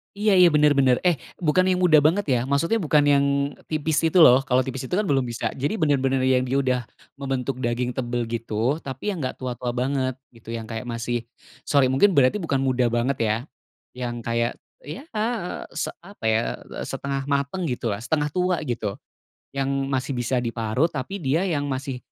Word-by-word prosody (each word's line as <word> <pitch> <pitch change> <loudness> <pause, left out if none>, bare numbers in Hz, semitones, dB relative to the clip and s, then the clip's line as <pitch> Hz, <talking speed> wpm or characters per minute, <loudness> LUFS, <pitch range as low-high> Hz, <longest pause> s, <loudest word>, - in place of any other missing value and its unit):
Iya 205 -2 +3
iya, 180 -1 +8
benar 150 -1 +4
benar. 130 -2 +4
Eh, 175 -4 +2 0.2
bukan 180 +3 +3
yang 185 -1 +1
muda 165 -4 +6
banget 160 +7 +4
ya, 125 -2 +3
maksudnya 140 +11 +1
bukan 155 -6 +3
yang 140 -1 +4 0.4
tipis 155 0 -1
itu, 165 +2 +4
loh. 130 -2 +7
Kalau 130 -2 +3
tipis 130 0 -5
itu 155 - -8
kan 205 - +3
belum 135 -2 +2
bisa 115 -2 -3
jadi, 140 +7 -1
benar-benar 135 -8 +1
yang 130 -1 +2
dia 130 +2 0
udah 130 -2 +1 0.4
membentuk 135 -1 -2
daging 120 0 -2
tebal 120 -1 -1
gitu. 115 +4 -1
Tapi 135 +6 -5
yang 195 - -2
nggak 130 - -5
tua-tua 125 -1 -3
banget, 130 +1 0 0.2
gitu. 115 0 -10
Yang 115 -1 -5
kayak 115 +1 -5
masih, 120 0 -2 0.5
sorry 140 -3 +3
mungkin 185 +10 +4
berarti 140 +5 +4
bukan 140 -8 -1
muda 130 -2 +1
banget, 120 +3 +1
ya. 110 0 +1 0.6
Yang 120 -1 -3
kayak, 115 +1 0 0.3
ya, 150 - -7
eee, 215 -4 -2
se - - -2
apa 185 - -12
ya, 110 0 +3 0.4
setengah 135 -1 -3
matang 140 +6 -1
gitu, 125 -4 -2
setengah 150 +7 -1
tua 180 +2 0
gitu. 120 -8 -3 0.6
Yang 135 0 -2 0.2
masih 130 0 -1
bisa 125 +1 -1
diparut, 115 +6 -1
tapi 135 +8 -4
dia 155 -1 0
yang 160 -7 -1
masih 135 -1 -3
135 Hz, 185 wpm, -24 LUFS, 125-155 Hz, 0.6 s, iya